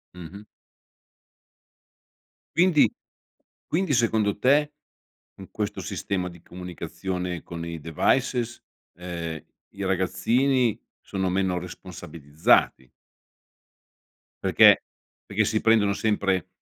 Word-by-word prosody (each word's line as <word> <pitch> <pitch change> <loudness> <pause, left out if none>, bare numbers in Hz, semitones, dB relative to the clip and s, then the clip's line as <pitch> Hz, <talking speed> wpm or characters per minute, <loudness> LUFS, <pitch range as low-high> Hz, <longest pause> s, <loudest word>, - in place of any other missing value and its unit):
Mh-mh. 90 +4 -10 2.1
Quindi 170 -3 +5 0.8
quindi, 170 -2 0
secondo 110 -4 +2
te, 145 +6 +3 0.6
con - - -12
questo - - -3
sistema 90 -2 -3
di 85 -1 -14
comunicazione 90 0 -5
con 85 -1 -7
i 85 -1 -6
devices 120 - 0 0.4
ehm, 85 -3 -5 0.3
i 100 0 -7
ragazzini 115 +7 +1 0.2
sono 95 -1 -2
meno 95 -1 0
responsabilizzati 80 -7 0 1.6
perché - - +6 0.4
perché 100 +1 0
si 110 - 0
prendono 110 -3 +4
sempre 100 -5 0
95 Hz, 85 wpm, -25 LUFS, 90-115 Hz, 2.1 s, perché